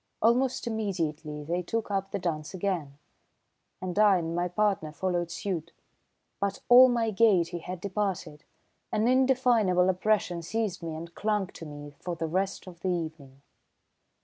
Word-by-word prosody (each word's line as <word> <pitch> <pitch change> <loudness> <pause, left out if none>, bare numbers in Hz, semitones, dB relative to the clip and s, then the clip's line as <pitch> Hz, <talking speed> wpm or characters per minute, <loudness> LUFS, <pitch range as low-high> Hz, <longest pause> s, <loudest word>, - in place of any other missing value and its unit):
Almost 250 +4 +2
immediately 165 -9 -3
they 170 +4 -1
took 220 +4 -3
up 195 -1 -1
the - - -2
dance 165 -2 -3
again, 170 -7 -2 0.8
and 185 +1 -3
I 205 -3 +6
and 165 -1 -3
my 175 +1 +1
partner 190 -4 0
followed 175 +1 -1
suit. 170 -3 -4 0.7
But 200 -1 -1
all 255 +1 +9
my 230 -2 +1
gaiety 185 -5 +3
had 180 +1 -6
departed. 190 -6 -3 0.5
An 215 +2 +1
indefinable 245 -8 +3
oppression 185 -2 0
seized 210 +1 -2
me 165 -2 -4
and 170 +2 -8
clung 210 0 0
to 165 - -10
me 145 0 -9
for 175 -1 -4
the 165 0 -3
rest 190 +4 -1
of 180 -2 -11
the 185 - -2
evening. 155 -6 -5
185 Hz, 150 wpm, -28 LUFS, 165-210 Hz, 0.8 s, all